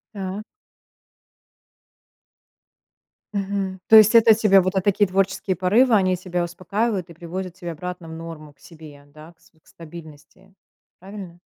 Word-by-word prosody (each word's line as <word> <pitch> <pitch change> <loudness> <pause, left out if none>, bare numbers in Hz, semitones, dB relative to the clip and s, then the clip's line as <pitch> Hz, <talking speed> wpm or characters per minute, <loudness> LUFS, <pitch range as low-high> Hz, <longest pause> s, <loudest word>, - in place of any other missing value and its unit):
Так. 195 +1 -5 2.9
Мгм. 195 -1 -3
То 220 - +6
есть 215 +1 +6
это 230 -1 +7
у - - +9
тебя 210 -3 +4
вот, 185 +2 -2
э, 190 - +2
такие 205 +1 +2
творческие 195 0 -1
порывы, 215 +8 +3
они 185 -2 +2
тебя 180 -1 -3
успокаивают 185 +3 -3
и - - -11
приводят 175 +2 -7
тебя 175 -3 -7
обратно 180 +1 -8
в 160 - -9
норму 160 -2 -10
к 140 - -41
себе, 155 -4 -14
да, 155 +3 -15
к 165 - -45
с - - -24
к 160 - -33
стабильности, 165 +3 -14 0.5
правильно? 190 -2 -10
185 Hz, 150 wpm, -22 LUFS, 165-195 Hz, 2.9 s, у